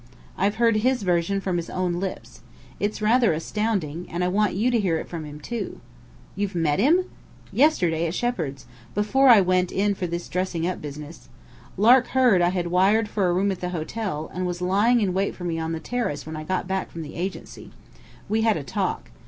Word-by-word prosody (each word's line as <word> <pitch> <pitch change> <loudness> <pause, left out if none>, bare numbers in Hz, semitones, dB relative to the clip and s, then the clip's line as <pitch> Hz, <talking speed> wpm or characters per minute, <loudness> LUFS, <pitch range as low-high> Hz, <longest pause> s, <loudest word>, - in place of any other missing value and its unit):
"I've 200 +2 +1
heard 230 -1 +3
his 250 +1 +1
version 180 +2 +1
from 185 -2 -1
his 170 - -4
own 180 -1 -1
lips. 190 0 -6 0.4
It's 210 +1 -2
rather 230 -2 +4
astounding. 180 -2 -2
And 175 +1 -2
I 180 - +1
want 210 +1 +1
you 230 +6 +1
to 235 - +2
hear 180 -6 +1
it - - -6
from 165 -3 -6
him, 150 0 -9
too." 235 +10 -5 0.6
"You've 200 -1 -2
met 160 -2 +1
him!" 335 - +4 0.5
"Yesterday 175 - +2
at 165 - -4
Shepheard's, 165 - -2 0.3
before 235 +7 +3
I 225 -5 +8
went 185 -1 +1
in 205 +1 +1
for 185 -2 -3
this 170 +1 -4
dressing 180 -2 -2
up 180 +1 -2
business. 150 +2 -9 0.5
Lark 245 +5 +6
heard 240 -9 +5
I 175 - +4
had 175 -2 -2
wired 205 +4 +3
for 200 -3 0
a 175 - +2
room 195 +3 +1
at 190 - -5
the 180 - -2
hotel, 175 -1 -4
and 180 0 -2
was 175 0 -3
lying 205 +7 +3
in 190 -3 +1
wait 195 +2 -1
for 180 - -9
me 165 -2 -2
on 160 0 -3
the 165 - -3
terrace 195 -6 -3
when 160 0 -6
I 155 0 -6
got 185 +2 -2
back 190 0 -2
from 165 - -7
the 150 - -9
Agency. 185 +3 -6 0.6
We 220 +1 +1
had 220 -3 +3
a 150 - -5
talk. 130 - -3
185 Hz, 210 wpm, -24 LUFS, 170-215 Hz, 0.6 s, I